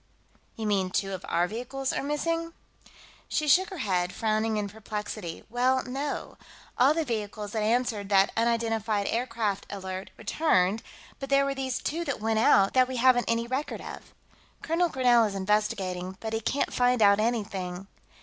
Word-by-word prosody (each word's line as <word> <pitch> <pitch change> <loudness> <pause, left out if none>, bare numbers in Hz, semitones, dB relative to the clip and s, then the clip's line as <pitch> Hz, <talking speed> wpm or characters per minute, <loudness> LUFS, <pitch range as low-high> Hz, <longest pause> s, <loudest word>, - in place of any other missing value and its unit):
"You 220 - -5
mean 195 -3 +1
two 195 +1 -1
of 185 - -6
our 170 +1 +2
vehicles 250 +6 -3
are - - -1
missing?" 330 +3 -2 0.7
She 305 - -1
shook 370 +7 +5
her 380 - -7
head, 180 -2 0
frowning 220 0 0
in 205 -1 -1
perplexity. 210 -4 -6
"Well, 255 +2 +1
no. 275 +3 -4 0.4
All 270 +5 +4
the 325 -1 0
vehicles 210 -3 -4
that 220 - -1
answered 220 -2 0
that 195 -1 +4
unidentified 225 -2 0
aircraft 230 -4 -1
alert 190 -1 -6
returned, 210 - +1 0.4
but 275 - -6
there 275 0 +4
were 275 - -1
these 265 -2 -2
two 330 +3 -2
that 280 -4 -2
went 220 0 0
out 195 -3 +5
that 255 -1 +4
we 260 0 -4
haven't 245 -1 +4
any 230 0 +1
record 260 +5 -3
of. - - -9 0.5
Colonel 335 +2 +1
Grinell 245 -4 +4
is 200 - -6
investigating, 190 -2 -1
but 220 0 -5
he 225 - -1
can't 275 +6 -1
find 245 -2 +3
out 200 0 +6
anything...." 200 -5 -2
225 Hz, 170 wpm, -27 LUFS, 200-260 Hz, 0.7 s, out